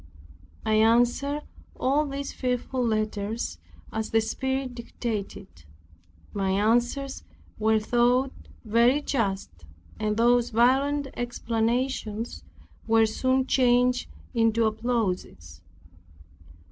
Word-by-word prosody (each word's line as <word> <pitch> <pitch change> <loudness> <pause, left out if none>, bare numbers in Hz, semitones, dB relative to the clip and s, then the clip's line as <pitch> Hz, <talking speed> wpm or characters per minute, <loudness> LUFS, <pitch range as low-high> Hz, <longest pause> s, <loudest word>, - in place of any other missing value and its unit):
I 215 -1 +2
answered 245 +6 +2 0.4
all 290 +3 +2
these 280 0 -5
fearful 250 0 -2
letters 215 -1 -2 0.3
as 220 0 -2
the 225 - +3
Spirit 265 +4 -2
dictated. 225 -4 -5 0.9
My 195 -1 -1
answers 240 +7 +1 0.4
were 220 0 +3
thought 245 +4 +2 0.3
very 235 +6 +3
just, 200 -9 -1 0.5
and 215 0 -1
those 240 +1 +3
violent 270 +5 +2
exclamations 235 -1 -2 0.4
were 225 0 +5
soon 260 +4 +1
changed 250 -1 +2 0.2
into 225 -1 +2
applauses. 215 - -2
235 Hz, 90 wpm, -26 LUFS, 220-255 Hz, 0.9 s, were